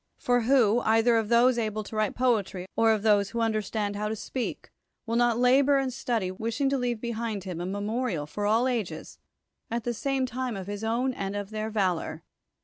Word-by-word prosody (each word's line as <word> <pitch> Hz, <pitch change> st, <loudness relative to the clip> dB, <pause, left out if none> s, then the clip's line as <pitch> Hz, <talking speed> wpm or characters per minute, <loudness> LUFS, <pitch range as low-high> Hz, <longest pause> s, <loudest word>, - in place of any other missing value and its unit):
For 245 Hz, 0 st, +1 dB
who, 235 Hz, -2 st, +4 dB
either 225 Hz, +1 st, +3 dB
of 220 Hz, -2 st, +1 dB
those 240 Hz, +1 st, +4 dB
able 215 Hz, -1 st, -2 dB
to 220 Hz, -, -9 dB
write 215 Hz, -1 st, 0 dB
poetry, 215 Hz, -7 st, 0 dB
or 225 Hz, 0 st, +4 dB
of 215 Hz, -2 st, 0 dB
those 205 Hz, -2 st, +3 dB
who 235 Hz, -, -4 dB
understand 215 Hz, -2 st, -1 dB
how 210 Hz, +1 st, -2 dB
to 220 Hz, -, -2 dB
speak, 245 Hz, +3 st, -5 dB, 0.3 s
will 230 Hz, -1 st, -2 dB
not 240 Hz, -1 st, +3 dB
labor 265 Hz, +3 st, +4 dB
and 265 Hz, -2 st, -1 dB
study, 235 Hz, -7 st, -1 dB
wishing 225 Hz, +7 st, -1 dB
to 275 Hz, -, +1 dB
leave 240 Hz, -2 st, -1 dB
behind 230 Hz, -3 st, -3 dB
him 180 Hz, -3 st, -5 dB
a 175 Hz, -, -3 dB
memorial 205 Hz, -3 st, -2 dB
for 205 Hz, +7 st, -3 dB
all 225 Hz, +4 st, +3 dB
ages, 235 Hz, -7 st, -4 dB, 0.5 s
at 235 Hz, 0 st, -2 dB
the 240 Hz, -, -1 dB
same 270 Hz, +3 st, -1 dB
time 255 Hz, -2 st, -3 dB
of 190 Hz, -, -6 dB
his 205 Hz, +2 st, -5 dB
own 235 Hz, +4 st, 0 dB
intellect -, -, -8 dB
and 195 Hz, +1 st, -3 dB
of 205 Hz, -1 st, -4 dB
their 215 Hz, 0 st, -3 dB
valor 185 Hz, -6 st, -1 dB
225 Hz, 210 wpm, -27 LUFS, 205-245 Hz, 0.5 s, who